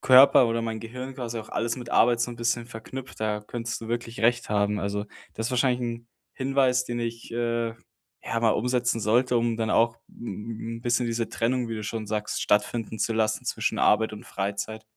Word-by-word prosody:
Körper 130 -1 +8
oder 115 0 0
mein 110 -1 -3
Gehirn 125 +3 -7
quasi 120 -3 -4
auch 110 - -8
alles 115 +1 -1
mit 120 -2 -7
Arbeit 120 0 +4
so 120 +1 0
'n - - -9
bisschen 115 0 0
verknüpft. 120 +2 -8
Da 105 -1 0
könntest 115 +2 -5
du 115 - -7
wirklich 120 0 -3
recht 120 +1 +2
haben. 105 0 +1
Also 100 +1 -2 0.3
das 110 +1 -2
wahrscheinlich 125 0 +2
'n 115 -1 -4 0.2
Hinweis, 130 -2 +2
den 120 -1 -3
ich, 115 0 -4
äh, 115 -1 -1 0.5
ja 115 - -2
mal 115 -1 +4
umsetzen 125 0 +1
sollte, 120 +4 +3
um 115 -1 0
dann 110 -2 -1
auch 115 0 +3
'n 115 +1 -6
'n - - -14
bisschen 120 0 +1
diese 115 0 -1
Trennung, 120 +1 0
wie 115 - -3
du 110 - -4
schon 110 0 -3
sagst, 105 0 -2
stattfinden 110 +1 +1
zu 115 - +1
lassen 110 -1 0
zwischen - - -1
Arbeit 110 +1 +3
und 105 - -8
Freizeit. 100 +3 -3
115 Hz, 200 wpm, -26 LUFS, 110-120 Hz, 0.5 s, Körper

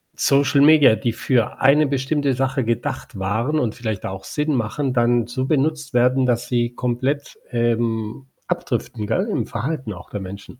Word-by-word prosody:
Social 140 0 +3
Media, 145 -6 +7
die 120 -1 -1
für 120 -1 0
eine 140 +3 +5
bestimmte 140 0 0
Sache 130 0 0
gedacht 115 -3 -3
waren 115 +11 0
und 115 -3 -1
vielleicht 110 -5 -4
auch 95 0 -6
Sinn 150 -1 -1
machen, 125 +4 -1
dann 120 -1 +2
so 130 +2 -2
benutzt 150 0 0
werden, 125 +2 +3
dass 120 0 0
sie 120 -1 0
komplett, 130 +4 -2
ähm, 115 +1 -1 0.2
abdriften, 105 -1 -3
gell, 185 - 0
im 120 - -1
Verhalten 125 0 -3
auch 90 +3 -12
der 100 - -4
Menschen. 100 +6 -9
125 Hz, 165 wpm, -21 LUFS, 115-140 Hz, 0.2 s, Media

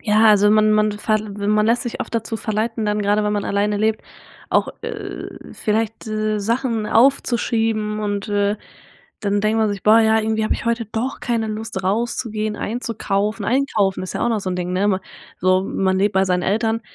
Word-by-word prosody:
ja, 215 0 +3
also 205 -1 +5
man 215 0 +4
man 215 0 +3
verl 215 0 -1 0.2
man 215 0 +3
lässt 235 +2 +2
sich 240 - -5
oft - - -5
dazu 225 0 -2
verleiten 220 +1 -2
dann, 210 0 0
gerade 205 +1 +2
wenn 210 - 0
man 205 -1 -1
alleine 205 +1 0
lebt, 215 +1 0 0.5
auch, - - +2
äh, 430 -4 -6 0.2
vielleicht, 220 +1 -2
äh, 215 0 -1
Sachen 230 0 -1
aufzuschieben 225 -4 +2
und, 205 0 -2
äh, 205 0 +1 0.6
dann 205 -1 0
denkt 215 +2 +1
man 220 -1 +2
sich: 200 -1 -5
„Boah 220 +2 +6
ja, 220 0 +4
irgendwie 220 0 0
habe - - +1
ich - - -6
heute 235 0 0
doch 230 +5 -3
keine 230 -3 -1
Lust 215 -2 -5
rauszugehen, 215 +1 -1
einzukaufen.“ 215 -2 -2
Einkaufen 220 -8 +1
ist 185 - -6
ja - - -1
auch - - +2
noch 220 - 0
so 190 - -3
'n 180 - -2
Ding, 180 0 -3
ne, 195 +3 +1
ma 190 -2 +1 0.4
so 185 +1 +3
man 190 -1 0
lebt 205 +1 +1
bei 190 0 +4
seinen 180 -1 0
Eltern 225 +3 0
215 Hz, 200 wpm, -20 LUFS, 205-225 Hz, 0.6 s, Boah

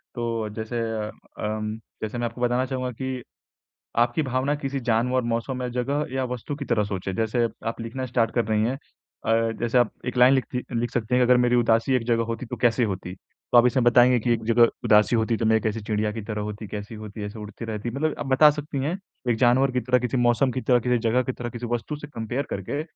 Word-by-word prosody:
तो 115 -2 -2
जैसे 115 +2 -3 0.2
अम 105 0 -4 0.3
अम, 110 0 -2 0.3
जैसे 110 +2 -3
मैं 120 - -1
आपको 120 +1 -6
बताना 125 +1 +2
चाहूँगा 130 -1 -3
कि 130 +1 -5 0.8
आपकी 120 +6 +2
भावना 130 +1 0
किसी 140 -2 -3
जानवर, 125 +2 +1
मौसम 120 +2 -2
या 125 - -2
जगह 135 +5 -1
या 130 -1 0
वस्तु 125 +4 -4
की 140 - -5
तरह 115 -5 +1
सोचें। 95 -1 -4
जैसे 115 +3 +1 0.2
आप 115 - -3
लिखना 125 +3 -4
स्टार्ट 115 -2 +1
कर 120 - +2
रही 105 0 +1
हैं। 115 +3 +1
अ, 115 -4 -2
जैसे 120 +1 +2
आप 120 -2 +3 0.2
एक 125 - -3
लाइन 125 +2 +7
लिखती 125 -1 -1
अ, 125 - -7
लिख 120 +1 0
सकती 120 0 -1
हैं 125 - +4
कि 125 - +1
अगर 125 - +7
मेरी 125 0 +3
उदासी 115 +2 +3
एक 125 - -1
जगह 115 -1 +2
होती 115 +2 -4
तो - - -5
कैसी 120 0 +2
होती? 90 -1 -6 0.4
तो 120 - +8
आप 120 - +6
इसमें 125 0 +2
बताएँगे 120 +1 +6
कि 120 +2 +1
एक 115 - -1
जगह 115 +1 +5 0.2
उदासी 105 +2 +5
होती 115 +1 +1
तो 115 - -2
मैं 110 0 +4
कैसी 110 0 -1
चिड़िया 105 0 -1
की 110 0 -5
तरह 105 0 -4
होती, 105 +1 -5
कैसी 105 +1 -6
होती? 105 -1 -8
ऐसे 105 +2 -7
उड़ती 105 +2 -8
रहती। 110 +1 -4
मतलब 150 +5 -1
आप - - -4
बता 135 +3 +6
सकती 145 -1 -5
हैं 170 +6 -1 0.3
एक 115 - +2
जानवर 130 +2 +4
की 125 - +1
तरह, 125 +1 +2
किसी 125 +1 -2
मौसम 120 +2 +3
की 130 - -2
तरह, 125 -1 +3
किसी 125 +1 +1
जगह 125 +3 +3
की 130 - -3
तरह, 120 -1 -5
किसी 120 +1 -6
वस्तु 120 +5 -2
से 145 0 -8
कंपेयर 120 +5 -3
करके। 100 +10 -3
120 Hz, 240 wpm, -25 LUFS, 110-125 Hz, 0.8 s, तो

